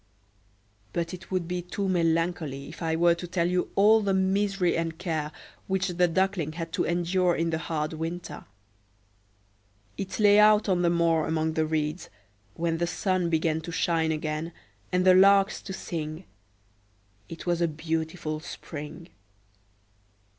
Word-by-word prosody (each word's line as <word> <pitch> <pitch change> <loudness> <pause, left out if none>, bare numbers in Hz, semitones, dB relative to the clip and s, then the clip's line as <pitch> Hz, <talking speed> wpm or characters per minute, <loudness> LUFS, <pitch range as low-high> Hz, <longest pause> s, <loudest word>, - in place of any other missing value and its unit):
But 170 +1 -2
it 185 - -9
would 185 -3 -1
be 180 0 -2
too 185 +3 -3
melancholy 165 -5 0
if 155 - -11
I 160 -1 0
were 170 +1 +4
to 175 +1 -6
tell 170 -1 0 0.3
all 215 +3 +6
the 200 -2 +1
misery 190 -1 +1
and 165 -1 -2
care 160 -4 -3 0.4
which 190 0 0
the 180 0 +2
Duckling 180 -3 0
had 165 0 -6
to - - 0
endure 175 +1 +1
in 165 0 0
the 160 - -1
hard 155 -1 -3
winter. 165 +2 -5 1.5
It 195 +2 -4
lay 205 -1 +6
out 210 0 +5
on 185 -3 +2
the 175 - +3
moor 165 -2 +2
among 160 0 0
the 160 0 0
reeds, 155 +2 -2 0.5
when 165 -1 -1
the 170 - 0
sun 185 -1 0
began 160 -1 +1
to 170 - -7
shine 165 -2 +1
again 155 +1 -3 0.4
and 180 0 +1
the 185 - +7
larks 195 +1 +5
to 195 - -8
sing: 165 -2 -5 1.0
it 165 - -8
was 175 -1 0
a 170 - +3
beautiful 160 0 -3
spring. 155 +1 -8
170 Hz, 155 wpm, -27 LUFS, 160-185 Hz, 1.5 s, the